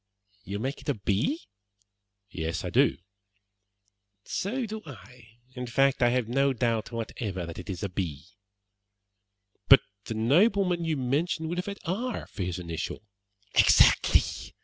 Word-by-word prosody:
"You 100 0 -4
make 135 +6 -4
it - - -6
a 145 - +1
B?" 105 - 0 0.9
"Yes, 80 -1 -3
I - - -3
do." - - +3 1.3
"So 245 +6 -2
do 220 0 -6
I. 120 -4 -14 0.2
In 125 -1 -5
fact, 135 +2 +2
I 120 - +5
have 125 -2 0
no 135 +3 +2
doubt 115 -2 -1
whatever 110 -5 -4
that 85 +1 -8
it 90 - -9
is 95 -1 -4
a - - 0
B." 85 -6 -4 1.4
"But - - +10 0.2
the 115 - -4
nobleman 175 - +3
you 160 -2 0
mentioned 155 +5 -1
would 175 +1 -2
have 180 - -4
had 200 0 -4
R 225 +8 -2
for 105 - -8
his 90 -1 -2
initial." 85 +2 -5 0.5
"Exactly! - - +6
125 Hz, 150 wpm, -28 LUFS, 100-165 Hz, 1.4 s, But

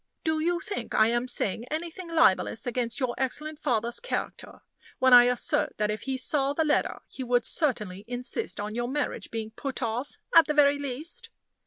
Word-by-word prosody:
Do 315 -1 0
you 345 +2 0
think 410 +2 -5
I 220 +1 +5
am 240 +1 0
saying 230 -2 0
anything 335 +3 -5
libelous 225 - +3
against 240 -1 -2
your 255 -3 0
excellent 300 +3 -3
father's 235 -5 0
character - - -5 0.3
when 260 -1 +4
I 245 0 +10
assert 245 0 0
that 210 0 0
if 210 -1 -4
he 265 - 0
saw 275 +1 +1
the 320 +2 0
letter 300 - 0
he 265 - -7
would 245 -1 +1
certainly 210 - -1
insist 250 - -1
on 210 +1 -4
your 240 +1 -2
marriage 290 +3 -3
being 220 -1 -5
put 270 +4 -5
off, 235 +5 -3 0.2
at 330 -2 +8
the 300 - -1
very 285 -1 +5
least?" 310 - -4
260 Hz, 185 wpm, -27 LUFS, 235-305 Hz, 0.3 s, I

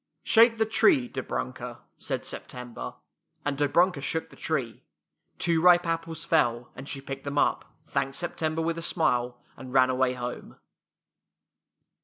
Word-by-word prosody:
" - - -53
Shake 230 0 +6
the 220 - +3
tree, 245 - +4
Dobrunka," 125 - -5
said - - -3
Sep - - -4
tember, 120 - -7 0.5
and 145 -1 0
Dobrunka 145 +3 +2
shook 160 +4 -2
the - - -14
tree. 130 -8 -3 0.6
Two 165 -2 +2
ripe 175 0 +6
apples 165 -1 -3
fell, 120 -7 +1
and 135 +2 -8
she 140 - -4
picked 135 0 -6
them 140 0 -4
up, - - +2 0.2
thanked 140 -2 -2
September 165 -1 -2
with 165 0 -1
a - - -5
smile, 125 -8 +1 0.2
and 130 -1 -10
ran 130 0 +5
away 130 0 +2
home. 125 -1 -6
145 Hz, 155 wpm, -27 LUFS, 130-165 Hz, 0.6 s, Shake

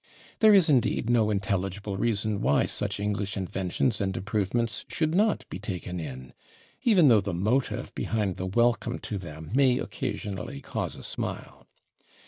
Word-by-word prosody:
There 215 -1 +7
is, 190 -4 +6
indeed, 125 -4 +2
no 110 -3 +3
intelligible 100 -1 -2
reason 105 0 0
why 70 - +3
such - - -2
English 100 0 -2
inventions 95 +4 -1
and 95 -1 -1
improvements 105 +4 -1
should 155 -1 0
not 210 +4 +2
be - - -7
taken 90 -3 -5
in, 65 -5 -7 0.5
even 195 -10 +5
though 115 -5 +6
the 100 -3 -3
motive 110 +9 0
behind 105 -5 -1
the 95 - -3
welcome 120 +4 +1
to 105 - -5
them 80 -2 -9
may 130 -2 +4
occasionally 95 -8 -4
cause - - -4
a - - -10
smile. - - -5
105 Hz, 150 wpm, -27 LUFS, 95-120 Hz, 0.5 s, There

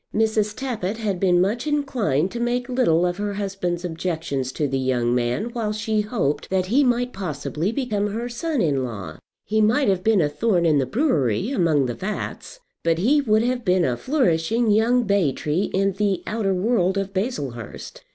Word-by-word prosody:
Mrs. 215 -1 +1
Tappitt 225 -6 -3
had 205 -5 -2
been 180 -2 +3
much 215 +9 0
inclined 235 - 0
to 235 - -5
make 240 +1 -1
little 240 -10 +2
of 175 0 -1
her 205 0 -3
husband's 190 -3 -3
objections 160 -6 -3
to 150 - -1
the 135 0 -1
young 125 -2 +1
man 125 - -1
while 225 -3 -2
she 215 0 0
hoped 195 - -2
that 185 -1 +1
he 250 +10 +3
might 245 -1 +1
possibly 165 0 -3
become 225 -6 -1
her 225 +4 -3
son 270 - -1
in 140 -5 +1
law. 100 -10 -6 0.3
He 215 +1 +1
might 220 +4 +3
have 185 -2 0
been 220 -1 +3
a 155 - +3
thorn 175 +3 +1
in 155 -3 +4
the 130 - 0
brewery, 195 - +1
among 165 - +2
the 120 - -2
vats, 210 - -5 0.2
but 165 -1 +2
he 265 - +3
would 220 -4 +2
have 245 0 -1
been 180 -3 +2
a 125 -2 0
flourishing 225 - +1
young 235 +4 +3
bay 200 -8 +2
tree 155 +9 -1
in 195 +1 +1
the 195 -2 0
outer 210 -3 -1
world 190 -1 +1
of 195 0 -2
Baslehurst. 145 - -4
195 Hz, 190 wpm, -23 LUFS, 165-230 Hz, 0.3 s, in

